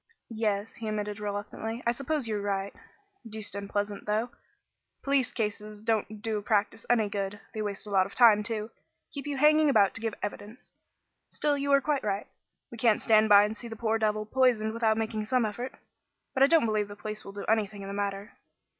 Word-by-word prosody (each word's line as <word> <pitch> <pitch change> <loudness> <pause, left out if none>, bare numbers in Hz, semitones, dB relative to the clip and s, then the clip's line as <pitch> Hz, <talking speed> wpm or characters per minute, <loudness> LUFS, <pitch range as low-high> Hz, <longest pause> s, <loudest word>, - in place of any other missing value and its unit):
"Yes," 215 -1 -1
he 225 - -7
admitted 210 -1 -3
reluctantly, 210 +3 -4
"I 235 - +3
suppose 275 +1 -2
you're 210 -2 -2
right. 200 -1 -2 0.6
Deuced 215 -2 -1
unpleasant 205 +1 -3
though. 220 +3 0 0.7
Police 275 -2 +1
cases 210 -1 -4
don't 215 -1 -1
do 220 -2 -1
a - - -8
practice 210 +1 0
any 225 -3 +3
good. 200 0 -3
They 215 - -3
waste 205 -1 -4
a 210 - -8
lot 190 -1 +3
of - - -14
time, 225 -4 +7
too; 215 0 -3 0.4
keep 285 0 -6
you 285 -1 -2
hanging 305 +2 +5
about 205 -7 +4
to 225 - -2
give 225 -2 -2
evidence. 205 +3 -7 0.6
Still, 295 -1 0
you 280 0 -1
are 280 0 +6
quite 285 0 0
right. 200 -1 -1 0.5
We 235 - -9
can't 225 -2 +4
stand 220 -1 +4
by 205 0 +8
and 210 +1 -2
see 235 - -9
the 225 - -7
poor 225 0 0
devil 215 -1 0
poisoned 225 -2 +2
without 225 -1 +2
making 220 -1 -2
some 250 +1 +2
effort. 240 +5 -5 0.6
But 265 - -1
I 275 - +8
don't 325 -4 +4
believe 215 -2 0
the 205 - -9
police 215 +2 -6
will 195 - -9
do 200 - -6
anything 210 -2 0
in - - -7
the 200 - -5
matter." 200 +1 -4
215 Hz, 205 wpm, -28 LUFS, 205-235 Hz, 0.7 s, by